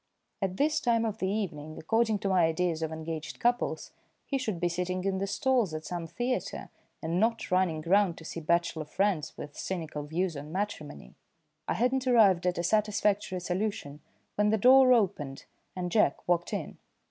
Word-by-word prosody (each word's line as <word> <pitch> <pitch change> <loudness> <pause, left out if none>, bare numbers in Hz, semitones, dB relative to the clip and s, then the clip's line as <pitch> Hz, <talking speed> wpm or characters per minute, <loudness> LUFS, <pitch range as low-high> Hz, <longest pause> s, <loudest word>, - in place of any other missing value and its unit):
At 190 -1 -2
this 305 +1 +2
time 230 -3 +2
of 220 -1 -3
the 190 - 0
evening, 160 -7 -4
according 220 +5 +1
to 195 - -1
my 185 -3 +4
ideas 165 0 0
of 160 -1 -2
engaged 160 -1 -6
couples, 240 +1 0 0.3
he 275 - -1
should 215 -9 -3
be 175 - +1
sitting 180 +1 -2
in 190 -1 0
the 195 - -1
stalls 225 - +1
at 155 0 -6
some 175 -2 -4
theatre, 245 +9 -3 0.3
and 165 +2 0
not 225 0 0
running 180 -4 +1
round 185 0 +3
to 160 - -11
see 165 - -5
bachelor 170 -1 0
friends 190 0 -1
with 145 0 -8
cynical 160 -5 -4
views 165 +4 -2
on 145 +2 -7
matrimony. 155 - -5 0.5
I - - 0
had 250 +3 +2
not 265 -1 -1
arrived 200 -8 +5
at 180 - 0
a 170 - -1
satisfactory 205 -1 +1
solution 180 -6 -3 0.3
when 210 0 +2
the 220 - +3
door 255 +4 +7
opened 170 - +1 0.3
and 180 -1 -3
Jack 215 - +2
walked 175 -1 +1
in. - - -5
185 Hz, 180 wpm, -29 LUFS, 165-215 Hz, 0.5 s, door